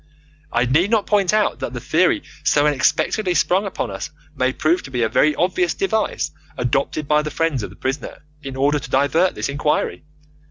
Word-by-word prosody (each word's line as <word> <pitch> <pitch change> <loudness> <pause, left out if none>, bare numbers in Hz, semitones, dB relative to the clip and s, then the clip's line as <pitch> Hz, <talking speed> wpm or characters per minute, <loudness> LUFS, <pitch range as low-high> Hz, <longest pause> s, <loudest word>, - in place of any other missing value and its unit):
I 120 +1 +2
need 155 +10 +2
not 220 -3 +2
point 200 -3 +2
out 215 -1 +1
that 120 - -4
the 120 - -4
theory 160 +9 +2 0.2
so 145 0 +3
unexpectedly 155 +6 +1
sprung 190 +4 +2
upon 125 - -4
us 95 0 -5 0.3
may 130 -1 +1
prove 155 +6 +1
to - - -10
be 125 -2 -1
a 110 - +1
very 150 +6 +3
obvious 175 -1 +1
device 195 - -1 0.3
adopted 135 +4 -1
by 150 +1 +3
the 150 - -4
friends 160 -5 -1
of - - -5
the - - -14
prisoner 135 +3 -4 0.2
in 135 -2 -7
order 145 +2 +2
to 125 - -9
divert 145 +7 +2
this - - -2
inquiry. 145 +2 -1
150 Hz, 195 wpm, -20 LUFS, 130-180 Hz, 0.3 s, so